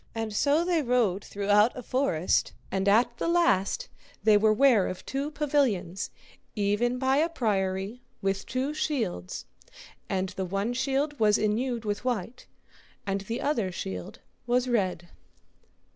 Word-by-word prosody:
And 225 -1 -3
so 295 +8 +3
they 345 -3 +2
rode 235 -7 +1
throughout 205 +4 +2
a 250 - -6
forest, 250 - +1 0.2
and 195 +1 +1
at 235 +3 +3
the - - -1
last 340 - +2 0.4
they 215 -1 +6
were 215 +1 +4
ware 225 -3 +4
of 185 - -6
two 275 +2 -2
pavilions, 265 - 0 0.5
even 210 +4 +1
by 265 +1 +2
a 320 +3 +2
priory, 200 - -1 0.2
with 195 0 -2
two 260 +4 -1
shields, 225 - -2 0.6
and 190 0 -1
the 190 - -4
one 195 +6 -1
shield 275 +3 -1
was 210 -1 +4
enewed 230 +2 -1
with 205 +1 -2
white, 245 -1 -3 0.6
and 195 0 -1
the 230 +5 -4
other 230 -10 0
shield 95 - -6 0.3
was 250 +1 +2
red. 185 -7 0
225 Hz, 145 wpm, -28 LUFS, 195-265 Hz, 0.6 s, they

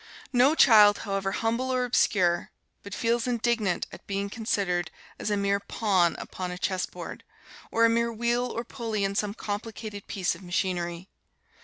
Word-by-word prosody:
No 255 +5 +5
child, 210 -7 +7
however 195 -1 -1
humble 230 +5 -1
or 255 -1 +1
obscure, 180 -7 +2 0.3
but 200 0 -7
feels 235 +1 0
indignant 235 -6 0
at - - -12
being 200 0 -2
considered 190 -6 -1 0.3
as - - -2
a 205 - +1
mere 200 0 +1
pawn 195 -4 +1
upon 185 -1 -5
a 180 - -5
chess 185 0 -1
board, - - -8 0.5
or 230 0 +3
a - - +5
mere 235 0 +1
wheel 235 +2 0
or 235 - -4
pulley 225 -4 -3
in 195 0 0
some 205 0 -1
complicated 210 -1 -6
piece 190 -4 -1
of 170 - -11
machinery. 175 -1 -2
205 Hz, 165 wpm, -27 LUFS, 190-230 Hz, 0.5 s, child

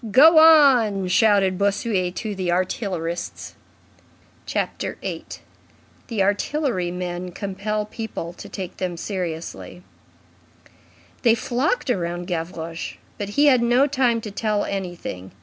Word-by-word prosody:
"Go 315 +9 +8
on!" 260 - +6
shouted 195 -1 +3
Bossuet 200 -2 0
to 215 -2 -3
the 185 -3 -2
artillerists. 180 -2 -3 0.9
CHAPTER - - -3
VIII—THE 220 -5 -7
ARTILLERY 205 - 0
MEN 180 0 -4
COMPEL 205 +3 -3
PEOPLE 215 -6 -6
TO - - -11
TAKE 185 -3 -6
THEM 180 -2 -3
SERIOUSLY 175 -1 -5 1.4
They 230 -2 +5
flocked 255 - -1
round 175 -4 -2
Gavroche. 165 -1 -5 0.2
But 205 -1 -3
he 290 - +5
had 260 -4 +5
no 240 +3 +4
time 255 -5 +1
to 215 - -7
tell 210 0 -1
anything. 175 - -5
200 Hz, 115 wpm, -23 LUFS, 180-235 Hz, 1.4 s, Go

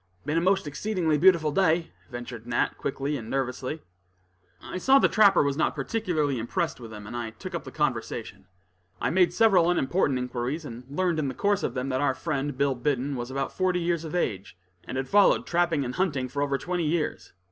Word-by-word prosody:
"Been 150 +2 -1
a - - -1
most 190 +1 +2
exceedingly 160 0 -1
beautiful 170 -3 +5
day," 165 0 +2 0.2
ventured 120 -2 -8
Nat, 120 0 0
quickly 140 +1 -2
and 115 -3 -8
nervously. 135 +3 -3 0.8
I 185 - -6
saw 265 +7 +5
the - - +5
trapper 200 -6 +5
was 140 -1 -1
not 160 - +1
particularly 155 - -1
impressed 165 +9 -2
with 115 -2 -9
him, 105 -1 -9
and 115 - -7
I 120 -2 -3
took 110 - -9
up - - -4
the - - -8
conversation. - - -3 0.5
I - - 0
made 180 +1 +4
several 195 -7 +4
unimportant 170 -4 +1
inquiries, 125 +5 -3
and 120 -2 -8
learned 170 +2 0
in 145 - 0
the 130 - -4
course 205 0 +1
of 120 - -2
them, 130 +1 -2
that 130 0 0
our 135 -2 +1
friend, 140 -1 -3
Bill 140 0 +2
Biddon, 135 +2 -1
was 120 0 -4
about 135 0 -3
forty 185 -1 +1
years 170 -1 -1
of 160 +2 -5
age, 100 - -2 0.3
and 130 - -5
had 130 0 -2
followed 205 0 +4
trapping 170 -5 +1
and 125 - -4
hunting 145 -8 0
for 140 +3 -4
over 140 -1 +1
twenty 175 +2 -2
years. 155 0 -2
145 Hz, 205 wpm, -27 LUFS, 130-175 Hz, 0.8 s, beautiful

